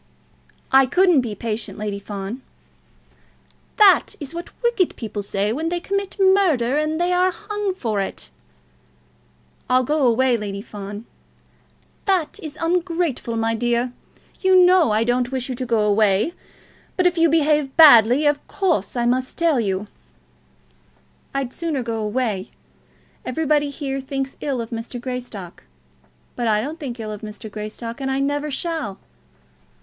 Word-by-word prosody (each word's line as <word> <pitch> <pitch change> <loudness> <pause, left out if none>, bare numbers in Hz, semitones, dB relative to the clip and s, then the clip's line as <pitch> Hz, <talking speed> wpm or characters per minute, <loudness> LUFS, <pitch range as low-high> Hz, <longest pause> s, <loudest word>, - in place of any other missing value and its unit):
"I 270 0 +6
couldn't 360 -1 +4
be 225 -4 -5
patient, 220 +1 -4
Lady 205 -1 -3
Fawn." 200 +4 -6 1.4
"That 415 -4 +5
is 290 0 -7
what 340 +1 -6
wicked 475 -7 +1
people 215 -3 -5
say 200 +1 -1
when 320 +6 -2
they 350 0 -1
commit 395 +2 -3
murder, 365 -11 +3
and 305 +1 0
then - - -2
they 350 +1 +1
are 365 +1 +3
hung 410 +1 -3
for 220 - -1
it." 65 - -5 1.4
"I'll 255 0 +4
go 295 0 +2
away, 245 +1 +3
Lady 200 -2 -5
Fawn 205 +1 -8 0.5
" - - -36
"That 370 -6 0
is 310 -1 -8
ungrateful, 335 -8 -1
my 225 0 0
dear. 240 +2 0 0.5
You 375 -1 +4
know 365 -2 +5
that - - 0
I 215 +1 +2
don't 245 +1 0
wish 260 -1 -3
you - - -2
to 250 0 -5
go 230 -2 +2
away. 210 - +2 0.6
But 365 - +2
if 360 -1 +3
you 330 0 +5
behave 300 -3 +2
badly, 265 -3 +8
of 290 0 +1
course 340 - -1
I 240 - +1
must 255 +2 0
tell 330 -6 +2
you 195 -4 -1
of - - -7
it." - - -28 1.4
"I'd 270 -2 -2
sooner 320 -6 -2
go 230 -1 -3
away. 210 -3 -2 0.7
Everybody 295 +2 0
here 275 -1 -4
thinks 270 0 -4
ill 270 -5 -1
of 225 - -7
Mr. 230 +2 -5
Greystock. 240 -8 -7 0.7
But 240 - -2
I 210 -1 +3
don't 300 +9 -5
think 255 -5 -6
ill 215 -1 -5
of 210 - -7
Mr. 215 0 -8
Greystock, 220 +4 -6
and 270 - -2
I 265 0 0
never 290 +2 -1
shall. 300 - -3
255 Hz, 160 wpm, -21 LUFS, 220-320 Hz, 1.4 s, badly